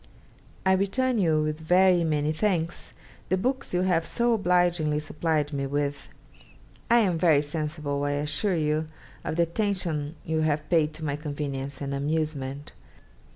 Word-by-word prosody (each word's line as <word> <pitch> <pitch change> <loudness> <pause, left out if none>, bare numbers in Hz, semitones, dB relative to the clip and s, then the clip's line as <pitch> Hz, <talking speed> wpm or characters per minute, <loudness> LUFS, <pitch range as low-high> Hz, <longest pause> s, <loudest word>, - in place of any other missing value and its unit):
'I 190 - +5
return 230 +6 +1
you, 160 -5 +3
with 155 0 -2
very 180 +2 +4
many 155 -1 +1
thanks, 170 -2 -1 0.4
the 185 - +2
books 260 +7 -1
you 180 0 +1
have 180 -3 +2
so 235 +7 +1
obligingly 175 -6 +2
supplied 155 -1 -1
me 140 -1 -1
with. 145 +1 -2 0.8
I 235 - +6
am 185 -8 +2
very 155 -4 +4
sensible, 150 -1 -3
I 145 0 0
assure 150 +7 -1
you, 155 0 0 0.4
of - - -3
the 170 - +3
attention 170 -5 -2
you 160 0 0
have 150 -1 0
paid 155 -2 +3
to 155 0 -6
my 145 -1 -1
convenience 140 -2 -5
and 140 0 -3
amusement. 145 -1 -2
155 Hz, 155 wpm, -26 LUFS, 145-180 Hz, 0.8 s, I